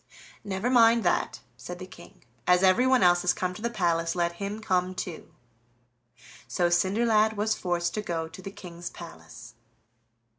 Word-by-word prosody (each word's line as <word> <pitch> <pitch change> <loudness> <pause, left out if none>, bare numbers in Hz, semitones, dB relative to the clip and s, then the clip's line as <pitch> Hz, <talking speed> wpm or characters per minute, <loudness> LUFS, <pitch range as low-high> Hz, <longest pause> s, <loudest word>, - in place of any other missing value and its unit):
"Never 200 +5 -2
mind 230 -2 +5
that," - - 0 0.2
said 175 - -8
the 185 - -8
King; 185 -2 -15 0.2
"as 180 +1 +4
everyone 250 +6 +4
else 175 0 +5
has 180 - +2
come 185 0 -2
to 180 - -10
the 235 - -1
palace, 170 -6 0
let 170 -1 +1
him 200 +2 -3
come 185 -3 0
too." 175 -3 -6 1.2
So 175 -1 +1
Cinderlad 215 +4 +3
was 215 +1 0
forced 175 -3 -2
to 215 - -2
go 165 -5 -3
to 165 +3 -12
the 195 - -7
King's 175 -4 -9
palace. - - -12
185 Hz, 160 wpm, -27 LUFS, 175-215 Hz, 1.2 s, mind